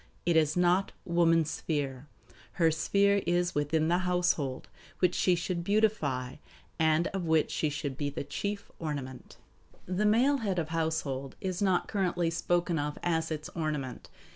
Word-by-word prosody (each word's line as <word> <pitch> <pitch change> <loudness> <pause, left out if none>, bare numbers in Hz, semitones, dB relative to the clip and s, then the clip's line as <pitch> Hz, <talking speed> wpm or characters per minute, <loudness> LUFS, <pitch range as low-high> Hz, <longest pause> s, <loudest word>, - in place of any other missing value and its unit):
It 170 -1 +2
is 155 0 +3
not 180 +2 +2
"woman's 165 -2 +3
sphere." 145 -3 -3 0.5
Her 165 -3 +3
sphere 200 +6 +2
is 175 0 +1
within 155 +2 +1
the 175 +2 +2
household, 180 -7 0 0.3
which 180 -1 +2
she 180 - +3
should 175 0 -2
"beautify," 175 - 0 0.4
and 160 +1 +3
of 190 -2 -3
which 160 -1 +2
she 155 - 0
should 140 -2 -4
be 145 -1 -1
the 140 - -5
"chief 200 +8 -4
ornament." 140 -5 -6 0.5
The 185 +4 0
male 255 +7 +4
head 200 -7 -2
of 160 -3 -1
the - - -6
household 155 -5 -2
is 185 -1 -3
not 190 -3 +2
currently 175 -4 0
spoken 175 -1 0
of 145 0 -3
as 160 -2 0
its 155 -1 -4
ornament. 150 -6 -4
165 Hz, 160 wpm, -30 LUFS, 150-180 Hz, 0.5 s, male